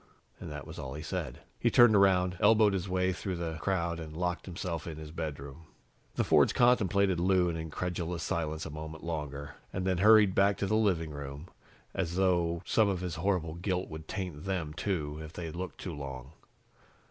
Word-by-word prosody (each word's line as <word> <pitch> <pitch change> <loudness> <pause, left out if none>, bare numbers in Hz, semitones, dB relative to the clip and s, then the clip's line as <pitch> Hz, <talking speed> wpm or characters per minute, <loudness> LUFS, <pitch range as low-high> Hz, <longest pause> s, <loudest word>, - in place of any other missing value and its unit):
And - - -7
that 75 -1 -6
was - - -9
all 65 +1 -6
he 75 - -6
said. 80 -7 -4 0.2
He - - +3
turned 120 -3 +7
around, 95 -2 +4
elbowed 105 -1 +5
his 95 -1 -2
way 95 0 +1
through 95 +1 -4
the 80 -2 -4
crowd 85 -3 0
and 80 -1 -8
locked 90 +1 -2
himself 85 -2 -4
in 80 -2 -6
his 80 -1 -8
bedroom. 75 0 -6 0.5
The - - +2
Fords - - +4
contemplated 100 -7 +3
Lou 90 0 +3
in 85 - -2
incredulous 85 +1 -3
silence 80 -1 -2
a 80 - -6
moment 80 +1 -7
longer, 75 -4 -5
and 90 0 -3
then 95 -2 +1
hurried 105 -1 +7
back 100 +1 +3
to - - -1
the 100 - -1
living 90 -8 +1
room, 70 +3 -7 0.4
as 90 -3 -2
though 85 -3 +1
some 110 -2 +3
of 95 -3 -1
his 90 -2 -3
horrible 85 -3 0
guilt 90 +2 -2
would 80 0 -8
taint 90 -4 -5
them, 90 -6 -2
too, 75 -4 -2
if 80 0 -9
they 85 -2 -5
looked 90 +3 -6
too 90 - -5
long. 65 -2 -7
85 Hz, 195 wpm, -30 LUFS, 80-95 Hz, 0.5 s, turned